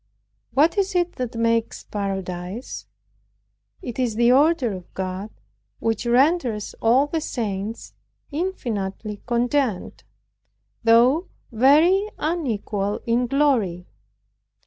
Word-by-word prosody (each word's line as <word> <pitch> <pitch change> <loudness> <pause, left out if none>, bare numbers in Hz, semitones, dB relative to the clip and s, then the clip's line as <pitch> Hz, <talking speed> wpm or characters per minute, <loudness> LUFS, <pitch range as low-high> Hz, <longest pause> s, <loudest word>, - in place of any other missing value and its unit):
What 320 +8 +4
is 390 0 0
it 350 0 0
that 250 -2 -4
makes 230 0 0
paradise? 190 +1 -5 1.0
It 245 -4 -6
is 240 -4 0
the 235 +2 +4
order 280 -3 +3
of 180 -2 -9
God, 190 +2 -4 0.5
which 225 +1 -2
renders 250 -4 +2
all 245 +5 +4
the 315 +2 -2
saints 215 -5 -4 0.4
infinitely 220 - -3
content, 245 -3 -1 0.8
though 245 +10 +4 0.2
very 310 - +4
unequal 220 - -2
in 240 +1 +1
glory! 235 -11 +1
235 Hz, 100 wpm, -23 LUFS, 210-290 Hz, 1.0 s, What